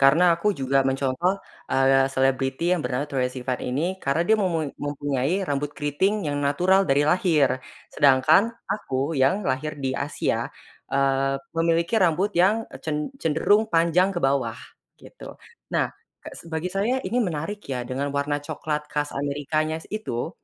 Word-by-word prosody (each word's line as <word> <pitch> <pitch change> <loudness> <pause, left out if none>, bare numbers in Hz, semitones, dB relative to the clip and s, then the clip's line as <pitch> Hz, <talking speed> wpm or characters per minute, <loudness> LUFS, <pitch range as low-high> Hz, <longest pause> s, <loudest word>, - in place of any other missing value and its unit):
karena 140 +5 +5
aku 205 +4 0
juga 135 0 +2
mencontoh, 140 +9 0 0.3
eee, 135 0 +4
selebriti 135 +5 +1
yang 180 - +1
bernama 130 +3 -1
Troye 130 -3 0
Sivan 125 -1 -3
ini, 165 +9 -2
karena 140 +2 0
dia 220 +6 +3
memui 165 -7 0
mempunyai 145 +4 -1
rambut 145 +1 -1
keriting 190 +9 0
yang 145 - -2
natural 180 +7 +2
dari 140 +1 +4
lahir. 150 -5 +2 0.3
Sedangkan 145 - +4 0.2
aku 140 -6 -2
yang 140 +11 +3
lahir 145 +3 -1
di 130 - +1
Asia, - - -2 0.4
eee, 135 0 +2 0.2
memiliki 165 +3 +1
rambut 185 +2 +2
yang, 200 +6 +4
eee, - - -10
cen 155 -2 -1 0.2
cenderung 205 +8 +2
panjang 170 +2 +2
ke 175 - 0
bawah 135 -4 +1 0.4
gitu. - - -12 0.4
Nah, - - +1 0.3
ke - - -7
s - - -13
bagi 165 +3 -3
saya 230 +7 0
ini 245 - -1
menarik 180 +1 -2
ya 125 -2 -2
dengan 135 +3 -3
warna 145 +1 0
coklat 150 +1 -4
khas 145 0 -2
Amerika-nya 145 +3 -1
s - - -15
itu, 165 - -3
150 Hz, 155 wpm, -24 LUFS, 135-180 Hz, 0.4 s, karena